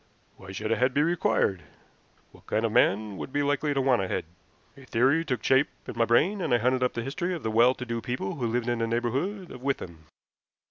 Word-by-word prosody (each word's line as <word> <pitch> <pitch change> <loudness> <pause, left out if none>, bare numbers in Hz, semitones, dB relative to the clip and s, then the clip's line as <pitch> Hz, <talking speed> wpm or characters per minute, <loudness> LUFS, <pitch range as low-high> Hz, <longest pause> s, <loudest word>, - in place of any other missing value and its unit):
Why 95 0 -11
should 110 +3 -4
a 115 - +2
head 130 +1 +1
be 145 - +4
required? 160 - +1 0.7
What - - -20
kind 110 +2 0
of 115 - -1
man 105 -3 +2
would - - -6
be 145 +1 0
likely 145 +1 0
to 135 - +2
want 130 -5 +3
a 95 - -2
head? - - -2 0.5
A 140 - -14
theory 130 +7 +2
took 130 -6 -3
shape 135 +2 +4 0.2
in - - -6
my 115 -1 +2
brain, 175 - +2
and 160 - -2
I - - +4
hunted 125 +2 +1
up 125 - +1
the 115 - -3
history 175 +8 -2
of 165 - -8
the 110 - -1
well 120 +3 +5
to 125 - -6
do 115 -1 -3
people 120 -6 -3
who 120 -4 -1
lived 120 +1 -1
in 120 -1 0
the 115 - 0
neighborhood 135 - -2
of 125 - -10
Withan. 85 - -4
125 Hz, 240 wpm, -27 LUFS, 115-140 Hz, 0.7 s, well